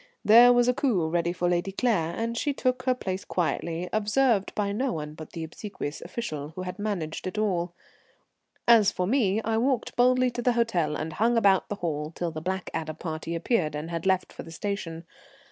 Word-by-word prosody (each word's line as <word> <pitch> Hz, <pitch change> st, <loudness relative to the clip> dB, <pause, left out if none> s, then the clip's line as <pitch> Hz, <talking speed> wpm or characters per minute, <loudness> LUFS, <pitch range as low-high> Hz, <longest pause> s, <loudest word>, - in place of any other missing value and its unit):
There 235 Hz, +3 st, +8 dB
was 245 Hz, 0 st, +4 dB
a 250 Hz, -, +4 dB
coupé 215 Hz, -, 0 dB
ready 170 Hz, 0 st, +1 dB
for 175 Hz, 0 st, -1 dB
Lady 175 Hz, +2 st, 0 dB
Claire, 190 Hz, -7 st, 0 dB
and 230 Hz, +1 st, -2 dB
she 285 Hz, +5 st, 0 dB
took 255 Hz, -1 st, 0 dB
her 255 Hz, -1 st, +3 dB
place 190 Hz, -5 st, -4 dB
quietly, 170 Hz, 0 st, -2 dB
observed 215 Hz, 0 st, +2 dB
by 205 Hz, -1 st, 0 dB
no 250 Hz, +5 st, -1 dB
one 150 Hz, -1 st, -5 dB
but 155 Hz, 0 st, -11 dB
the 165 Hz, -, -5 dB
obsequious 160 Hz, -2 st, -6 dB
official 160 Hz, -6 st, -5 dB
who 185 Hz, -, -4 dB
had 180 Hz, +3 st, -6 dB
managed 185 Hz, -7 st, -3 dB
it 185 Hz, -, -5 dB
all. 180 Hz, -5 st, 0 dB, 0.9 s
As 220 Hz, -4 st, +6 dB
for 180 Hz, -, -1 dB
me, 220 Hz, -2 st, +1 dB
I 225 Hz, 0 st, 0 dB
walked 255 Hz, 0 st, 0 dB
boldly 255 Hz, +1 st, +4 dB
to 240 Hz, -, -4 dB
the 245 Hz, 0 st, +2 dB
hotel 180 Hz, -11 st, +1 dB
and 155 Hz, +1 st, -4 dB
hung 235 Hz, +5 st, +2 dB
about 195 Hz, -4 st, +3 dB
the 205 Hz, -, -2 dB
hall 155 Hz, -5 st, -3 dB
till 175 Hz, -1 st, -2 dB
the 155 Hz, -1 st, -6 dB
Blackadder 165 Hz, -3 st, -3 dB
party 160 Hz, 0 st, -5 dB
appeared 165 Hz, -3 st, 0 dB
and 155 Hz, +3 st, -5 dB
had 165 Hz, +2 st, -3 dB
left 190 Hz, -1 st, +1 dB
for -, -, -8 dB
the -, -, -11 dB
station. 165 Hz, -2 st, -4 dB
190 Hz, 200 wpm, -27 LUFS, 165-230 Hz, 0.9 s, There